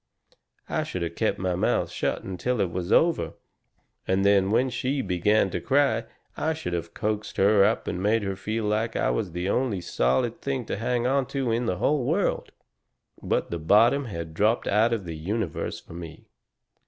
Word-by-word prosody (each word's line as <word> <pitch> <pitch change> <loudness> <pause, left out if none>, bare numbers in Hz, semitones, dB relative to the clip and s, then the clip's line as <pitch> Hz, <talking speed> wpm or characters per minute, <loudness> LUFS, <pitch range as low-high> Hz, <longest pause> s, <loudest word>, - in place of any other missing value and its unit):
I - - -1
should 90 - -4
have 85 - -3
kept - - 0
my 95 -1 -1
mouth 90 - 0
shut - - -2
until 105 +6 -2
it 95 -4 +1
was 90 +2 -4
all - - +7
over, 85 - -2 0.7
and 95 +1 +2
then 100 -1 +4
when 125 +4 +2
she 135 +3 -1
began 95 +2 +2
to - - -3
cry 140 +1 +2 0.3
I 160 0 -1
should 90 - -5
have 85 -1 -4
coaxed 105 0 -3
her 100 0 +5
up - - +1
and 90 - -2
made 105 +2 +2
her 95 -1 -2
feel 110 +4 -3
like 110 +2 0
I - - +1
was 100 -6 -2
the 90 +1 -2
only 115 -2 0
solid 65 - 0
thing 135 -3 -2
to - - -3
hang 120 +2 -1
on 135 0 +1
to 135 -4 -1
in 115 +1 0
the 90 - 0
whole 145 +7 +1
world. - - 0 0.7
"But - - -1
the 85 - -2
bottom 115 - +4
had 85 -7 -6
dropped 105 +7 +1
out 110 +3 +3
of 110 -5 -2
the 85 -2 -5
universe 95 +2 -3
for - - -14
me. 85 -2 -9
105 Hz, 195 wpm, -26 LUFS, 90-120 Hz, 0.7 s, all